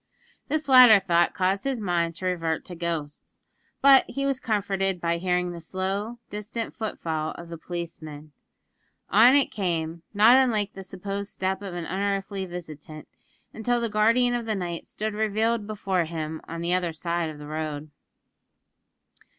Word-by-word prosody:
This 310 0 -1
latter 250 -5 +9
thought 175 -3 +2
caused 190 +1 +1
his 270 -3 -1
mind 170 -4 0
to 185 - -6
revert 165 -3 -1
to 180 - -8
ghosts; 165 -4 -5 0.4
but 275 -1 +8
he 275 0 -2
was 275 -2 0
comforted 195 -5 -1
by 170 0 0
hearing 180 0 0
the 170 -1 -8
slow, 195 +6 -3
distant 210 +3 -5
foot 220 -2 -4
fall 155 -1 -3
of 170 -1 -10
the 170 - -7
policeman. 155 -3 -7 0.8
On 240 +6 +7
it 280 -2 +3
came, 170 -4 -2
not 220 +4 +6
unlike 220 -6 +2
the 195 - -8
supposed 195 +2 -5
step 190 +1 -2
of 195 -3 -6
an 175 -2 -4
unearthly 195 +1 -2
visitant, 155 -3 -9 0.5
until 240 +2 0
the 230 -1 -1
guardian 230 +4 +3
of 240 -2 -2
the 220 - 0
night 175 -3 -4
stood 215 0 -4
revealed 220 +1 0
before 195 -4 -1
him 160 -1 -5
on 165 +1 -6
the 170 +1 0
other 180 -2 0
side 170 0 -2
of 155 - -8
the 150 - -9
road. 155 -1 -5
190 Hz, 165 wpm, -26 LUFS, 170-215 Hz, 0.8 s, latter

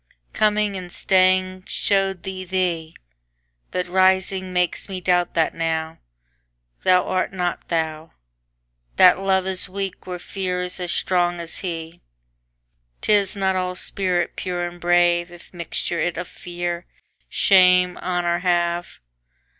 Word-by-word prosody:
Coming 210 -1 +2
and 180 -1 -8
staying 185 0 +2
show'd 195 -3 0
thee 190 -1 -5
thee; 175 -3 -2 0.7
But 180 0 -2
rising 190 0 +2
makes 180 +2 -1
me 190 -1 -4
doubt 180 -1 +1
that 165 -1 +2
nowThou - - -3
art 185 0 -1
not 180 -2 -3
thou. 160 -1 -2 0.8
That - - +7
Love 190 -1 +1
is 190 0 -2
weak 195 0 -5
where 180 -1 -4
Fear's 180 0 -3
as 175 -1 -3
strong 175 -1 +1
as 170 -1 -5
he;'Tis - - -4
not 190 -1 +1
all 180 0 -1
spirit 180 -2 -1
pure 175 -1 -3
and 175 0 -8
brave, 175 0 +3
If 175 +1 -15
mixture 170 0 -3
it 175 -2 -1
of 175 0 -4
Fear, 175 0 -5 0.4
Shame, 180 -2 +5
Honour 175 -1 -1
have. 175 -1 0
180 Hz, 125 wpm, -22 LUFS, 170-185 Hz, 0.8 s, That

